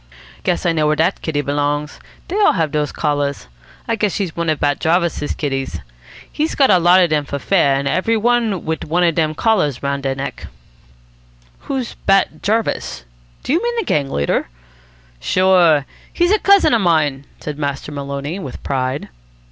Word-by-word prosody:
"Guess 180 - -1
I 175 - +3
know 155 -2 +1
where 150 - +2
dat 165 +5 0
kitty 150 -3 -1
belongs. 145 +1 -2 0.3
Dey 365 - -4
all 410 - +5
have 160 -5 0
dose 150 0 -1
collars. 145 - -1 0.4
I 230 - +1
guess 210 -2 0
she's 190 -6 -3
one 170 -1 -1
of 155 - 0
Bat 145 -1 +1
Jarvis's 170 -2 0
kitties. 135 -3 -3 0.5
He's 310 +2 -1
got 275 -2 +4
a 180 - +5
lot 175 +2 +5
of 170 - 0
dem 150 -1 +2
for 140 - -4
fair, 140 -2 +2
and 140 0 -1
every 225 +9 +1
one 230 -4 +1
wit 160 0 -2
one 175 +3 0
of 170 -1 +3
dem 155 -1 0
collars 155 - +1
round 140 0 -1
deir 135 -1 -2
neck." 135 +1 -6 1.2
"Who's 265 -4 -2
Bat 195 -5 +2
Jarvis? 215 - -1 0.4
Do 265 - -1
you 340 - +2
mean 475 0 -1
the 455 - -1
gang 140 - 0
leader?" 70 - -1 0.7
"Sure. 170 - +3 0.3
He's 350 +2 +1
a 425 - +4
cousin 395 -8 +4
of 230 - +3
mine," 150 -6 +1
said 150 -1 -6
Master 140 0 -3
Maloney 140 +4 -5
with 140 -9 -8
pride. 130 +1 -2
160 Hz, 180 wpm, -18 LUFS, 145-195 Hz, 1.2 s, all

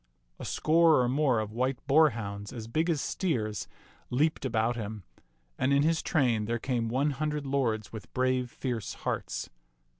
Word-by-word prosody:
A - - -6
score 160 -1 +4
or 125 - +2
more 130 -2 +2
of 105 -1 -3
white 130 +2 0
boarhounds 115 -9 +2
as 115 -4 -6
big 160 +9 0
as 160 -4 +1
steers 115 - -1 0.4
leaped 150 +3 +1
about 115 -1 +1
him, 105 -3 -5 0.6
and 130 - +2
in 140 +1 +4
his 160 +1 +2
train 120 -8 +1
there 120 +2 -1
came 120 -2 -1
one 135 +5 +1
hundred 150 +1 -2
lords 120 -7 -1
with 110 - -9
brave, 130 -1 +1
fierce 120 -5 -4
hearts. - - -3
125 Hz, 160 wpm, -29 LUFS, 115-145 Hz, 0.6 s, score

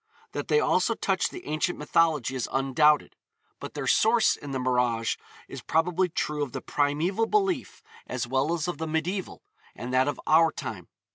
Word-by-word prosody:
That - - -4
they 450 - +4
also - - +2
touch - - 0
the 360 - -10
ancient 155 +3 -1
mythology 150 -4 +1
is 130 -3 -3
undoubted; 135 +3 +2 0.4
but - - -8
their - - -3
source 225 +1 +4
in 145 - -10
the 135 - -2
mirage 125 -3 +1 0.3
is - - -8
probably 180 +3 +1
true 150 -2 -2
of 140 -4 -3
the - - -3
primeval 165 +10 0
belief 390 - 0 0.2
as 125 -1 -3
well 135 +5 0
as 160 -1 -3
of 175 -4 -4
the 160 - -3
medieval, 170 +5 -3 0.3
and 125 +1 -6
that 130 +1 +3
of 145 - -2
our 160 +1 +5
time. - - -7
150 Hz, 180 wpm, -27 LUFS, 130-175 Hz, 0.4 s, our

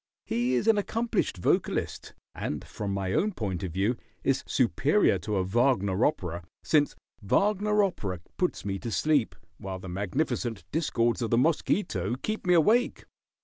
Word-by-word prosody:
He 120 +2 0
is 125 - 0
an 225 -2 +4
accomplished 225 - -1
vocalist, 90 - -1 0.2
and 75 - -4
from 100 -1 -5
my 95 -1 -2
own 210 +1 +1
point 95 - -3
of 95 - -4
view 105 +7 +1 0.3
is - - +1
superior - - +2
to 105 - -3
a 95 - +1
Wagner 105 -1 +2
opera, 85 - -3 0.2
since 150 -2 +2 0.3
Wagner 210 - +2
opera 100 - -2 0.2
puts 180 - -1
me 95 -1 -2
to 120 - -5
sleep, 145 +1 +1 0.2
while 95 -1 -5
the 95 - -9
magnificent 100 - -2
discords 125 -7 +1
of 115 - -1
the 115 - +3
mosquito 125 - +1
keep 215 +8 -4
me 180 - +5
awake. 220 +9 +3
120 Hz, 155 wpm, -28 LUFS, -, 0.3 s, me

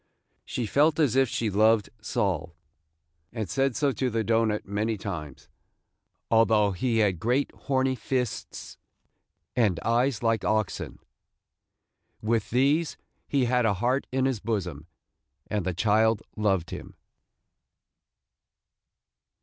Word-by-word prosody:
She 120 - -3
felt 150 +8 +3
as 140 -6 +3
if 135 -2 +3
she 115 -2 -1
loved 110 +1 +3
Sol, 90 -6 -2 0.8
and 110 -4 -4
said 135 +4 0
so 140 -1 +2
to 130 0 -1
the 115 -1 -1
doughnut 110 -1 +1
many 105 +2 -1
times, 80 -9 -7 0.4
– - - -52
although 110 -2 +4
he 115 +5 0
had 100 -6 +2
great 125 +7 +1
horny 130 -1 0
fists, 125 -1 -4 0.8
and 105 -8 +2
eyes 120 +1 +1
like 115 -1 +1
oxen. 110 -3 -1 1.2
With 110 0 0
these, 140 +7 +2 0.3
he 135 -3 +1
had 125 0 +2
a 100 - +1
heart 125 +7 0
in 130 0 +1
his 130 -5 0
bosom, 90 -9 -3 0.6
and 105 -3 -1
the - - +1
child 110 +2 +2
loved 100 -5 0
him. - - -8
115 Hz, 125 wpm, -27 LUFS, 105-130 Hz, 1.2 s, although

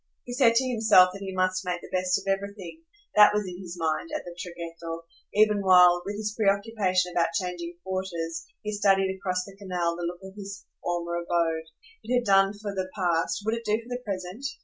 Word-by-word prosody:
He 245 - -7
said 245 -3 +4
to 260 +2 +3
himself 215 -6 +5
that 195 - -9
he 195 -1 -4
must 185 0 0
make 180 -1 -2
the - - -6
best 185 0 +2
of - - -7
everything; 200 - -3 0.3
that 210 0 +8
was 210 -1 0
in 180 0 -7
his 175 -1 -8
mind, 160 - -1
at 305 - -3
the 175 -1 -8
traghetto, 165 -1 -7 0.3
even 210 -1 +4
while, 180 -2 +6
with 200 +2 -4
his 210 0 -3
preoccupation 200 -3 +1
about 170 -1 +2
changing 175 -1 -3
quarters, 170 -3 -4 0.2
he 210 - -3
studied, 195 -2 +2
across 185 -1 -2
the 195 - -12
canal, 180 -4 -2
the 175 - -7
look 175 +1 -6
of 190 0 -10
his 200 -1 -8 0.2
former 170 0 -2
abode. 170 -2 0 0.4
It 250 - 0
had 245 -1 +1
done 195 0 +4
for 205 -1 -5
the 190 -1 -3
past, 175 0 0
would 220 - +1
it 230 0 -3
do 215 -1 +1
for 230 +1 -13
the 250 0 -4
present? 195 +2 -5
190 Hz, 210 wpm, -27 LUFS, 175-205 Hz, 0.4 s, that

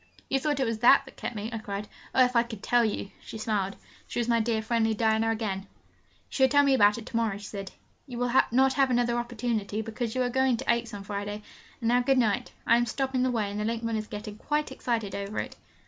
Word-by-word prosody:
'You 270 - +2
thought 290 0 0
it 265 - +2
was 225 -1 -2
that 275 +4 +6
that 265 - -14
kept - - -5
me!' 215 +2 -4
I 225 - -3
cried. 205 -1 -5 0.3
'Oh, 255 - +7
if 250 0 -3
I 235 - +6
could 225 -4 -8
tell 240 -1 +3
you!' 210 -2 -2
She - - -8
smiled: 210 -3 -1 0.3
she - - -3
was 235 - 0
my 235 -1 +3
dear, 220 -1 0
friendly 225 -1 +1
Diana 220 +1 +2
again. 215 -4 -1
'You 195 - -13 0.7
shall 265 -1 +4
tell 285 0 +5
me 280 - +3
all 265 - +4
about 205 -1 +5
it 230 - -8
to - - -8
morrow,' 225 -4 +1
she 205 - -10
said. 195 -2 -6 0.4
'You 245 -3 -7
will 245 0 0 0.2
not 265 +2 +4
have 270 -2 +3
another 240 -1 +2
opportunity, 225 -3 -2
because 225 +1 -4
we 255 - +1
are 250 - +2
going 260 -1 +2
to - - +1
Aix 235 -1 -3
on 200 - -7
Friday. 205 +1 -5 0.4
And 230 - -1
now, 245 +1 +4
good 265 +2 +2
night. 240 0 +1
I 235 - +5
am 240 0 +1
stopping 265 +2 -1
the 255 - +2
way, 215 -5 -1
and 205 - -4
the - - -1
linkman 230 +1 -1
is 215 0 -3
getting 210 0 -7
quite 300 0 -1
excited 225 -5 -2
over 200 +1 -4
it.' - - -3
230 Hz, 255 wpm, -28 LUFS, 215-245 Hz, 0.7 s, Oh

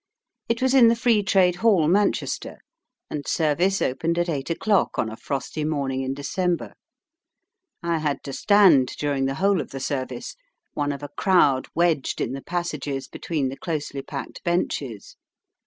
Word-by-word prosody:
It 230 +2 0
was 260 0 +3
in 255 -4 +7
the 230 - +4
Free 230 -2 +3
Trade 185 -2 +3
Hall, 190 -7 +3
Manchester, 200 +4 0 0.5
and 145 -2 -4
service 175 +5 +1
opened 165 +6 -1
at 175 0 0
eight 140 -3 -3
o'clock 200 +4 +1
on 110 - -1
a - - -6
frosty 140 +5 -4
morning 140 -4 -1
in 135 0 -3
December. 175 +5 -2 1.1
I 170 -1 0
had 150 -2 -2
to 135 - -6
stand 180 -12 +4
during 140 -2 0
the 135 0 -1
whole 195 +1 +2
of - - -8
the 135 - -6
service, 130 -2 -4 0.4
one 145 -1 -1
of 140 0 -6
a 145 - -5
crowd 145 -5 +3
wedged 170 -5 +1
in - - -1
the 135 - -5
passages 150 -6 -3
between 150 -6 -2
the 135 - -7
closely 150 -4 -4
packed 140 0 -7
benches. 140 - -2
155 Hz, 165 wpm, -24 LUFS, 135-180 Hz, 1.1 s, in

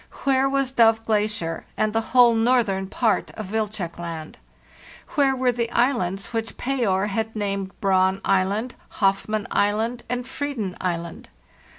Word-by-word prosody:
Where 270 0 +3
was 275 -1 0
Dove 225 -3 +4
Glacier 210 -6 -1
and 215 0 +1
the 225 - +2
whole 240 +1 +5
northern 225 -5 +2
part 220 +2 0
of 210 -3 -7
Wilczek 210 -6 -3
Land? 165 -2 -7 0.7
Where 275 -3 +2
were 255 -1 +2
the 235 -1 -2
islands 235 -5 0
which 225 0 -3
Payer 230 -8 0
had 220 +2 -2
named 195 -2 -3
Braun 190 -1 +2
Island, 200 +6 +1 0.2
Hoff 195 -1 +2
mann 215 -1 -2
Island, 220 +4 +1
and 245 0 -2
Freeden 260 -9 -4
Island? 170 -2 -4
215 Hz, 145 wpm, -23 LUFS, 195-240 Hz, 0.7 s, whole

